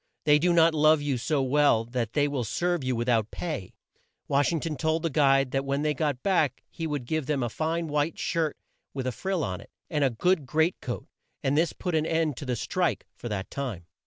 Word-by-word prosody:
They 150 -1 +5
do 175 +3 +3
not 165 -1 +5
love 155 0 +5
you 140 -4 0
so 145 +2 0
well 135 -4 +3
that 120 -2 -3
they 145 -1 +3
will 140 -4 -2
serve 175 +7 -1
you 130 -1 0
with 120 +1 -2
out 110 -3 +2
pay." 150 - -5 0.5
Wash 140 +3 +2
ing 165 - 0
ton 155 0 -3
told 160 +4 0
the 165 - 0
guide 135 -2 +3
that 135 0 0
when 140 +1 -1
they 150 0 +2
got 145 -3 -1
back 180 -7 +1
he 165 - -4
would 145 -5 -3
give 155 +1 -2
him 140 -4 +1
a 120 - -1
fine 165 +6 -2
white 150 +2 0
shirt 165 -3 -1 0.4
with 130 -2 -3
a 130 - 0
frill 185 - -2
on 90 -6 -3
it, - - -15 0.2
and 150 -3 +1
a 135 - +4
good 150 +5 +1
great 160 +6 +1
coat, 120 - -5 0.4
and 135 +1 +1
this 165 +2 +2
put 180 - -4
an 155 0 +1
end 160 -3 +1
to 145 - -7
the 125 - 0
"strike" 175 - -1
for 120 - -7
that 100 -2 -4
time. 120 -12 -4
145 Hz, 235 wpm, -27 LUFS, 130-160 Hz, 0.5 s, They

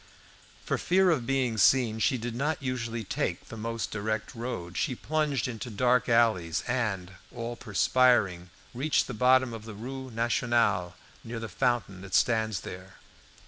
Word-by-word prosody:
For - - -1
fear 185 0 +3
of 130 -8 -1
being 130 -5 0
seen, 115 -1 +4
she 130 +3 +2
did 120 0 -4
not 145 +4 -2
usually 115 -3 -3
take 95 - -3
the - - -7
most 115 +1 -4
direct 110 +1 -3
road. 115 -7 -5
She 125 - 0
plunged 150 -1 -1
into 120 -1 -5
dark 125 +3 +2
alleys, 95 -7 +2
and, 105 -7 -1 0.2
all 115 +1 -5
perspiring, 110 -5 +2 0.2
reached 140 +5 +1
the 125 - -6
bottom 125 +1 +4
of 110 -1 -8
the 110 -2 -8
Rue 130 +4 -6
Nationale, 115 -5 +1 0.3
near 115 0 -5
the 115 - -5
fountain 120 -6 -1
that 100 -1 -4
stands 110 -5 +2
there. 95 +1 -9
115 Hz, 155 wpm, -28 LUFS, 110-125 Hz, 0.3 s, seen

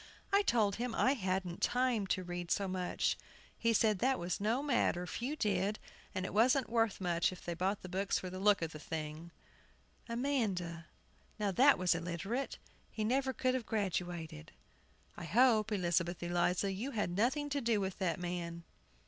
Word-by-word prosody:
I 400 - +6
told 215 - +2
him 240 -1 -2
I 260 - +4
hadn't 185 -6 -2
time 245 -5 +1
to 185 -1 0
read 175 -1 -5
so 200 +1 +1
much. 185 -1 -1 0.4
He 230 - +1
said 215 -2 +3
that 260 +3 +2
was 175 +2 -3
no 230 +7 +1
matter, 240 -10 +1
few 250 +10 -3
did, 205 -4 0 0.4
and 185 - -1
it - - -5
wasn't 250 +5 +4
much 225 -3 +2
worth 175 -2 +1
it 185 - -9
they 175 - -2
bought 190 +4 -1
books 190 +2 -1
for 185 - -5
the 185 - -6
look 200 -2 +4
of 165 - -3
the 155 - -8
thing. 155 +1 -5 0.8
AMANDA. 205 - -1 0.5
Now, 205 -2 0
that 270 +8 +6
was 180 0 +3
illiterate; 180 +10 -3 0.3
he 220 - -3
never 265 +4 +1
could 255 0 0
have 255 -3 -2
graduated. 175 - -3 0.6
I - - -7
hope, 225 - +4
Elizabeth 175 -3 0
Eliza, 175 +3 +1
you 210 +8 -3
had 180 -4 0
nothing 265 +8 +1
to 285 0 0
do 230 -3 +2
with 190 -1 -3
that 180 -3 0
man. 170 -1 -4
195 Hz, 175 wpm, -34 LUFS, 175-235 Hz, 0.8 s, I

